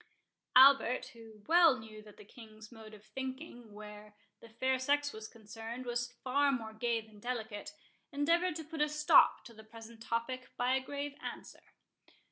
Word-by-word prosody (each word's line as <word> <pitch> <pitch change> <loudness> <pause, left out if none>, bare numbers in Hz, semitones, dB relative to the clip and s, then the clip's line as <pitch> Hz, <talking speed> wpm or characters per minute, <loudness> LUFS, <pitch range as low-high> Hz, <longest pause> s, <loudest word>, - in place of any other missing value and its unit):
Albert, 255 -1 +6
who 225 -2 -15
well 330 -4 +5
knew 220 -2 -11
that 210 -1 -16
the - - -14
King's 215 0 -14
mode 220 -2 -12
of 210 0 -18
thinking, 260 -1 -8
where 210 0 -12 0.2
the 230 - -15
fair 260 +3 -1
sex 285 +2 0
was 220 0 -8
concerned, 225 +3 -9
was 240 0 -2
far 280 +2 +2
more 225 -4 -4
gay 230 +1 -1
than 215 -1 -18
delicate, 220 -3 -5 0.4
endeavoured 335 +4 +1
to 320 - -5
put 315 0 -6
a 300 - +2
stop 300 -2 +4
to 235 - -12
the 220 0 -14
present 225 +1 -13
topic 245 +3 -3
by 250 +1 +1
a 265 - +1
grave 285 +1 -5
answer. - - -10
240 Hz, 170 wpm, -33 LUFS, 220-270 Hz, 0.4 s, Albert